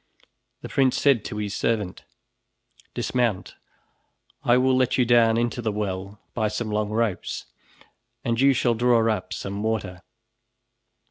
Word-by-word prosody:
The - - -6
prince 130 -2 +2
said 140 -6 +3
to - - -5
the 105 -1 -2
servant: 105 -1 -2 0.9
"Dismount, 120 -7 -1 0.9
I 120 +1 +4
will 130 0 +3
let 130 -1 +2
you 125 - +3
down 115 -1 +4
into 120 +1 -1
the 110 -2 -1
well 100 0 -4
by 110 -2 0
some 110 +1 -3
long 105 0 0
ropes 110 -3 -2 0.8
and 115 +1 0
you 140 0 +6
shall 120 -1 +2
draw 115 -1 +3
up - - -9
some 100 +1 -4
water." 105 -5 -2
115 Hz, 140 wpm, -24 LUFS, 105-120 Hz, 0.9 s, you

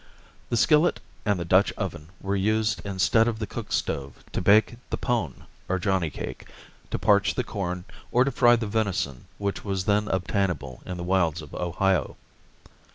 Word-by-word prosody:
The 120 - +1
skillet 150 +7 +4 0.3
and 100 -3 +2
the 85 - -3
Dutch 95 +4 +4
oven 75 +2 -5
were 100 +1 -1
used 110 +2 +1
instead 100 +3 +3
of 115 -2 -1
the 110 - -3
cook - - -7
stove 70 0 -2
to - - -2
bake 105 +5 +4
the - - -2
pone 115 - -2 0.2
or 95 - +1
johnny 95 -2 +1
cake, - - -7 0.4
to - - -1
parch 100 -1 +3
the 125 - 0
corn, 90 -5 -4 0.3
or 125 - +5
to 140 - 0
fry 120 -1 +5
the 115 -1 -2
venison 100 - -1
which 100 -1 -3
was 95 -2 -2
then 105 +1 +2
obtainable 90 -9 -1
in 90 - -4
the 85 - -5
wilds 85 -3 +1
of 75 - -13
Ohio. 90 -2 0
95 Hz, 175 wpm, -26 LUFS, 90-110 Hz, 0.4 s, or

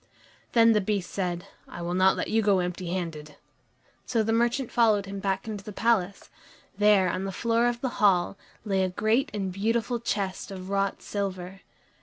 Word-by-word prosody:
Then 230 -1 +6
the 210 -2 +3
Beast 200 -2 -2
said, 175 -3 -3 0.2
"I 175 - -8
will 175 +1 -2
not 185 +1 +4
let - - -2
you 225 +1 +2
go 200 -2 +3
empty 180 0 -3
handed." 165 -4 -4 0.7
So 230 -3 +1
the 225 +1 0
merchant 240 +2 +1
followed 215 -4 +3
him 195 0 -6
back 195 +1 -2
into 210 -2 -5
the 210 - -8
palace. 205 -3 0 0.4
There, 205 -2 +4
on 185 +2 -2
the 195 - -3
floor 230 +3 +1
of 240 0 -2
the 260 - 0
hall, 195 -2 +3 0.3
lay 195 -2 +1
a 185 - 0
great 225 +9 +1
and 195 -3 -3
beautiful 230 +4 0
chest 200 -5 -3
of 190 -1 -7
wrought 195 -1 -1
silver. 195 -2 -4
200 Hz, 185 wpm, -27 LUFS, 185-225 Hz, 0.7 s, Then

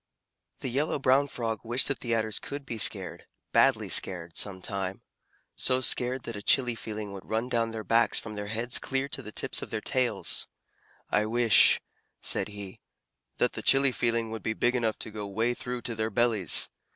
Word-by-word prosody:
The - - -2
Yellow 140 +6 0
Brown 135 +1 +3
Frog 115 -5 -3
wished 120 +3 +1
that 140 - -1
the 120 -2 -1
Adders 110 -1 -2
could 140 0 -7
be 115 -3 -5
scared, 95 -4 0 0.2
badly - - +3
scared, 85 -3 +1
some 95 -2 -1
time: 95 0 -4 0.5
so 130 0 +2
scared 125 0 +2
that 115 - -6
a 100 - -6
chilly 125 +2 +3
feeling 105 -3 -6
would 100 -1 -10
run 115 +3 -1
down 115 -2 0
their 110 -1 -6
backs 115 +2 +3
from 110 - -8
their 105 -1 -5
heads 115 +3 +1
clear 135 0 -2
to - - -4
the 105 - -9
tips - - -2
of - - -7
their - - -3
tails. 120 -3 0 0.6
"I 105 +1 +2
wish," 115 -1 +5 0.4
said - - +2
he, 100 -2 -9 0.6
"that - - +1
the - - -5
chilly 135 0 +5
feeling 115 -2 -1
would 110 - -5
be 110 - -2
big 120 +3 +1
enough 115 -3 0
to 110 - -3
go 105 -1 -6
way 115 +5 0
through 125 0 -5
to 120 - -3
their 110 0 -2
bellies. 110 -5 +3
115 Hz, 195 wpm, -28 LUFS, 105-125 Hz, 0.6 s, wish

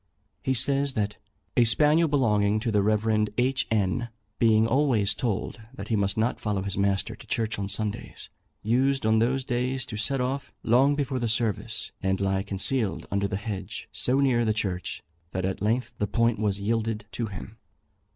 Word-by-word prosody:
He 130 - 0
says 140 +3 +3
that 105 -2 -2 0.4
"A 120 - +5
spaniel 150 +8 +4
belonging 110 -7 +2
to 115 - -1
the 105 -1 +3
Rev. 105 +1 +2
H. 130 +1 +1
N., 110 +3 0 0.3
being 110 -1 +4
always 115 -5 +2
told 115 0 -3
that 100 -2 -8
he 115 - +2
must 100 0 0
not 115 +3 0
follow 100 -3 -1
his 100 -1 -2
master 100 0 0
to - - -15
church 110 -3 -1
on 100 - -2
Sundays, 105 +1 -3 0.3
used 130 +4 +1
on 110 0 +4
those 130 +3 +1
days 125 +1 -1
to 110 - -6
set 135 +5 0
off 130 +2 -2
long 135 +5 +4
before 135 -3 -1
the 120 - -1
service, 110 -2 -1
and 95 0 0
lie 95 -1 +1
concealed 100 +3 -1
under 100 0 +1
the 95 - -3
hedge, 105 -2 -6
so 130 +2 +1
near 130 -4 +3
the 110 -1 +2
church, 95 -4 -3 0.3
that 95 0 -1
at 95 0 -3
length 120 +3 0
the 105 - 0
point 115 0 +1
was 100 -2 0
yielded 110 +1 -1
to 115 +1 -3
him." 105 +3 -9
110 Hz, 180 wpm, -26 LUFS, 100-125 Hz, 0.4 s, A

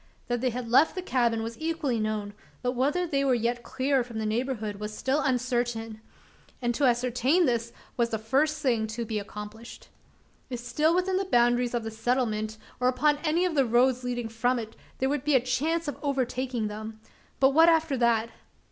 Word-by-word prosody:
That 240 -1 0
they 255 - +2
had 245 0 -5
left 270 +9 +4
the 370 - -4
cabin 235 -7 +1
was 230 +1 -6
equally 315 -7 -1
known; 215 -1 -2 0.3
but 250 - +1
whether 285 +8 0
they 275 -4 0
were 265 -2 +3
yet 240 +1 -1
clear 270 +3 0
off 245 - -2
from 235 -2 -7
the 220 - -2
neighbourhood, 220 -2 -2
was 210 0 -5
still 270 +3 +1
uncertain; 240 -4 -1 0.6
and 240 -1 0
to 280 +4 +1
ascertain 250 +7 +2
this, 235 -2 0 0.3
was 235 -1 +2
the 220 - -1
first 295 +8 0
thing 230 -5 +1
to 230 +2 -4
be 220 -1 -2
accomplished. 210 +2 -9 0.6
If 250 - -3
still 300 +7 +1
within 370 +1 +1
the 390 - 0
boundaries 240 -5 +2
of 235 - -1
the 225 - -5
settlement, 220 -2 -1 0.2
or 250 - +2
upon 290 +4 +2
any 335 +3 +2
of 360 - 0
the 280 -3 +4
roads 250 +1 +2
leading 245 -2 -2
from 245 +3 0
it, 220 -1 -6 0.2
there 265 - 0
would 280 -1 -1
be 295 -1 +2
a - - +7
chance 300 +7 -1
of 290 - -4
overtaking 255 -4 -1
them. 215 +1 -7 0.4
But 270 0 +5
what 325 +4 +6
after 320 -3 +2
that? 230 -1 +2
245 Hz, 200 wpm, -27 LUFS, 225-275 Hz, 0.6 s, a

